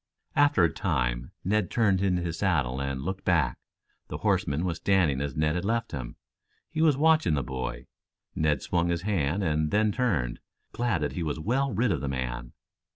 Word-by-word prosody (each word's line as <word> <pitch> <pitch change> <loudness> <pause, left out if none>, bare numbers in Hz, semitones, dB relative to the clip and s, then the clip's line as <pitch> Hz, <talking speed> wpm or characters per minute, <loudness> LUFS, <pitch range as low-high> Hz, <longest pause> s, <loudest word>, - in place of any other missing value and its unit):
After 145 -10 +4
a 85 - +3
time - - -1
Ned 100 +1 +1
turned 100 -5 +2
in 95 -2 +2
his 85 -2 -3
saddle 70 -10 +1
and 70 -1 -3
looked 95 +3 -4
back. 80 -9 +1 0.5
The - - -5
horseman 70 +5 0
was 85 -2 -1
standing 85 -7 +2
as 70 -2 -3
Ned 75 0 +1
had 90 +1 -2
left 115 +2 -1
him. 65 -5 -6 0.6
He 155 - -1
was 155 -4 +4
watching 155 - +4
the 70 - -1
boy. 65 +1 -5 0.5
Ned 75 -3 +1
swung 85 -1 0
his 85 0 -1
hand, 95 -2 0
and 80 -2 +1
then 105 +2 +2
turned, 90 - 0 0.3
glad 115 -9 0
that 75 - -1
he 90 - -4
was 80 -1 -2
well 130 - 0
rid 115 +2 +1
of 80 - -1
the 70 - -2
man. - - -4
85 Hz, 190 wpm, -27 LUFS, 70-100 Hz, 0.6 s, After